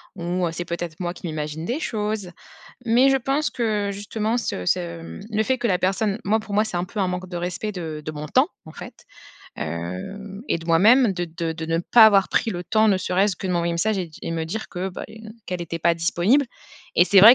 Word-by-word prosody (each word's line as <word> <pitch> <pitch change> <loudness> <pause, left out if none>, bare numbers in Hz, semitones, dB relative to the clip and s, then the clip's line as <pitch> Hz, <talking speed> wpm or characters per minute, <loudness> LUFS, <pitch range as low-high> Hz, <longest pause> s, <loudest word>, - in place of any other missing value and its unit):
ou 175 0 -1
c'est 175 - -3
peut-être 170 -2 -5
moi 175 -1 -2
qui 180 - -7
m'imagine 155 0 -4
des 245 - -1
choses. 210 -5 -2 0.6
Mais, 240 +4 +5
je 270 - +4
pense 275 +4 0
que 210 -4 -1
justement 210 +3 -2
ce 90 - -3
ce, 170 - 0
mmh, 165 - -9
le 215 0 +1
fait 260 +3 +1
que 240 - 0
la 180 -3 +2
personne 195 +3 0
moi 220 +3 +2
pour 210 -1 -7
moi 210 +1 +4
c'est 215 -5 -4
un 175 - 0
peu 195 +4 -8
un 195 - +2
manque 180 0 -4
de 175 - -5
respect 180 +4 -3
de 160 -5 -5
de 155 - -3
mon 150 0 -6
temps, - - +3 0.2
en - - -11
fait, - - -11 0.5
hem, 90 - -5
et - - +1
de 165 - -11
moi-même 210 +8 +5
de 175 -1 -2
de 165 0 -4
de 160 0 -6
ne 165 0 +1
pas 220 +6 +7
avoir 200 -2 +5
pris 225 - +1
le 175 -1 -4
temps 215 +5 +3
ne 205 -3 +4
serait-ce 190 +2 +1
que 190 - -6
de - - 0
m'envoyer 170 -1 +1
un - - -2
message 205 +4 +1
et 180 - -2
di 155 - -15
et - - -3
me 165 -1 -2
dire 210 +7 -5
que 180 +2 -3
bah, 180 - -7
les 220 - -12
ne 220 -1 -10 0.2
qu'elle 180 -1 -3
était 165 0 -5
pas 170 +1 +3
disponible, 175 - +2 0.5
et 175 - +6
c'est 195 +2 +5
vrai 225 +5 +11
185 Hz, 255 wpm, -23 LUFS, 170-215 Hz, 0.6 s, vrai